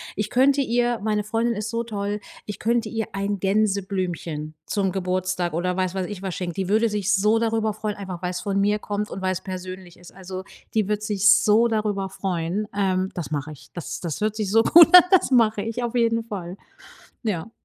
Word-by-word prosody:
Ich 210 0 -2
könnte 275 +2 +4
ihr 240 -1 +1
meine 210 -1 0
Freundin 225 +2 0
ist 210 +1 -4
so 230 +1 -2
toll, 205 -2 -3 0.3
ich 205 -2 -6
könnte 230 -1 0
ihr 225 -2 -3
ein 200 0 -2
Gänseblümchen 190 -6 -1
zum 195 -3 0
Geburtstag 185 -2 -1
oder 180 +2 -1
weiß 185 -1 0
was 190 -2 -2
ich 205 -3 -7
was 190 -3 -3
schenken. 175 -2 -4
Die 190 +1 -3
würde 220 +2 +3
sich 210 -1 0
so 210 +3 +3
darüber 225 -1 0
freuen, 210 0 -4
einfach 185 -3 -7
weil's 180 0 -2
von 200 -1 -1
mir 210 +1 +2
kommt 210 0 -3
und 190 - -6
weil's 185 -1 -1
persönlich 185 -1 -8
ist. 175 - -14
Also, 185 0 -7 0.3
die 215 -3 +1
wird 210 0 -1
sich 205 -1 +2
so 215 +3 +5
darüber 210 -3 -1
freuen, 185 +2 -2
ähm, 190 -1 +1
das 170 -7 -5
mache 145 +1 -3
ich. 150 - -13
Das 175 - -6
das 165 -4 -4
hört 215 0 0
sich 215 -3 -2
so 225 +2 +4
gut 335 +6 +8
an, 360 - +11
das 370 -7 +4
mache 220 -4 +3
ich 230 +3 -3
auf 240 +1 -3
jeden 230 -1 +2
Fall. 190 -5 -7 0.7
Ja. 210 -3 -3
205 Hz, 205 wpm, -23 LUFS, 185-220 Hz, 0.7 s, an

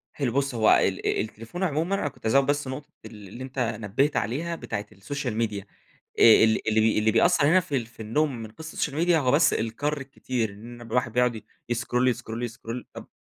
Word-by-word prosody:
حلو 135 -5 -1
بُص 140 -1 0
هو 110 -1 +4
ال - - +3
آآ - - +1
التليفون 115 - -6
عمومًا 165 +3 0
أنا 170 - -1
كنت 130 - -10
هازود 135 +4 +4
بس 145 -1 0
نقطة 145 +3 -6 0.2
ال 105 -3 -11
اللي 120 +7 -8
أنتَ 130 0 -6
نبِّهت 115 +5 0
عليها 155 +11 -2
بتاعة 105 -9 -5
الsocial 130 +6 -4
media. 105 -3 -2 0.6
آآ، 110 -1 +8
ال 110 0 +2
اللي 110 0 +3
بي 110 -1 +3
اللي 110 +1 +2
بيأثر 145 - +4
هنا 185 +4 +5
في 145 -6 -2
ال 115 - -3
في 115 0 -22
النوم 135 +5 0
من 110 - -9
قِصة 160 +6 -10
الsocial 145 -2 -1
media - - +5
هو 130 -5 +2
بس 150 +2 +4
الكَر 145 +7 -2
الكتير، 130 -4 -3
إن 115 +4 -11
بيبقى 120 -1 -11
الواحد 125 -2 +1
بيقعد 125 -1 +2
ي 105 - -9 0.2
يسكرول 125 +1 0
يسكرول 115 -1 -2
يسكرول 120 +1 -6
طب - - -9
125 Hz, 220 wpm, -26 LUFS, 110-145 Hz, 0.6 s, آآ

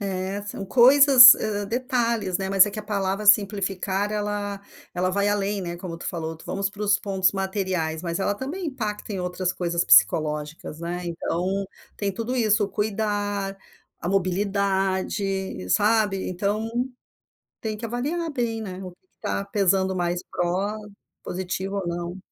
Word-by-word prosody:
É, 195 0 -3
são 205 -1 -6
coisas, 255 +2 +9
hã, 205 -2 -3
detalhes, 235 -5 -1
né, 190 0 -3
mas 195 0 +6
é 205 - -3
que 215 - -7
a - - -4
palavra 200 0 -2
simplificar 200 -1 +2
ela 205 -1 -3 0.4
ela 185 +1 0
vai 200 +2 +1
além, 205 0 0
né, 175 -1 -5
como 170 -2 -7
tu - - -7
falou, 165 -2 -4
vamos 195 0 -2
para 210 0 -8
os 205 -1 +3
pontos 190 -2 +1
materiais, 190 -5 -2
mas 170 0 -3
ela 205 +1 0
também 315 - -5
impacta 215 -6 -4
em 190 - -3
outras 180 0 -2
coisas 170 -1 -1
psicológicas, 150 +9 +2
né. 175 +1 -4
Então 180 +3 -2 0.3
tem 200 -1 -1
tudo 230 +5 -3
isso, 220 -3 +2
o 200 - -5
cuidar, 205 -2 -2 0.4
a 170 - -3
mobilidade, 195 - -1
sabe. 210 - +2
Então 205 +4 -2 0.9
tem 220 -1 -3
que 230 +2 -6
avaliar 295 +8 -2
bem, 235 -4 -2
né, 190 -2 -7
o 185 - -7
que 175 - -22
que - - -48
tá 200 - -2
pesando 190 -2 +1
mais 175 0 -1
pro 200 +4 -2 0.3
positivo 190 +2 -4
ou 185 -3 -3
não. 175 +1 -4
195 Hz, 160 wpm, -24 LUFS, 185-210 Hz, 0.9 s, coisas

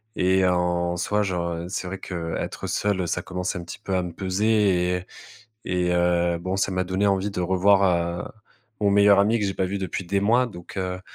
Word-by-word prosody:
et 95 +1 +3
en 90 -1 +1
soi, 105 +4 0
genre, 90 -3 -2
heu, 85 +1 -5
c'est 95 0 -4
vrai 95 +2 -5
que, - - -8
heu, 85 -2 -3
être - - -5
seul, 100 -3 0
ça 85 - -2
commence 90 0 -4
un 85 - -7
petit 85 - -9
peu 95 - -3
à - - +1
me 90 -1 -6
peser 95 +4 -1 0.5
et 90 - -12 0.6
et 90 -1 0
et 90 - +1
heu, 85 0 +2
bon, 95 +2 -3
ça 95 0 0
m'a 95 0 -1
donné 95 +3 0
envie 100 0 +1
de 100 - -3
revoir, 95 +2 +3 0.4
heu, - - -5 0.6
mon 100 -2 +2
meilleur 100 0 +6
ami 110 +3 +3
que - - +1
j'ai 95 - -1
pas 95 - -1
vu 95 +2 -3
depuis 95 -1 -4
des 100 +3 0
mois 120 +5 +3
donc, 90 -4 -11
heu. 90 -1 -3
95 Hz, 230 wpm, -24 LUFS, 90-100 Hz, 0.6 s, meilleur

